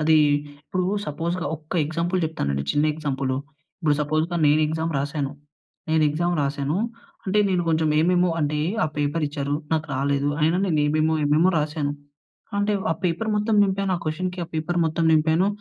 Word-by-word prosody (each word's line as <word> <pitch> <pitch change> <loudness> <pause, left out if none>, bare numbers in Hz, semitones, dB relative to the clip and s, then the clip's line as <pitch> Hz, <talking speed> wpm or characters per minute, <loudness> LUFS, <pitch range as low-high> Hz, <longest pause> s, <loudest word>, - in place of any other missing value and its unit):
అది 155 +1 +4 0.5
ఇప్పుడు 185 +2 -2 0.2
సపోజ్‌గా 165 +3 -2
ఒక్క 155 +2 -11
ఎగ్జాంపుల్ 170 +4 -1
చెప్తానండి 70 - -2
చిన్న 145 +1 +2
ఎగ్జాంపుల్. 135 -4 -2 0.5
ఇప్పుడు 150 -3 +2
సపోజ్‌గా 155 +4 0
నేను 150 +2 +4
ఎగ్జామ్ 160 +1 -2
రాశాను. 145 0 -2 0.6
నేను 160 -1 +3
ఎగ్జామ్ 175 +3 0
రాసాను 140 +3 -1 0.5
అంటే 200 +3 +2
నేను 180 -2 +1
కొంచెం 160 -1 +2
ఏమేమో 180 +2 +3
అంటే 150 0 0 0.4
పేపరిచ్చారు. 145 -1 -1 0.2
నాకు 155 -1 0
రాలేదు. 140 +1 0
అయినా 160 +3 +3
నేను 165 -6 +1
ఏమేమో, 155 +1 +2
ఏమేమో 155 +5 +4
రాసాను. 150 -1 -1 0.7
అంటే 205 +1 +1 0.3
పేపర్ 180 +6 0
మొత్తం 210 +1 +1
నింపాను 195 0 0
ఆ - - -5
క్వెషన్‌కి 180 +4 -3
పేపర్ 165 +3 -1
మొత్తం 165 +1 0
నింపాను. 160 +4 +3
155 Hz, 145 wpm, -24 LUFS, 145-175 Hz, 0.7 s, అది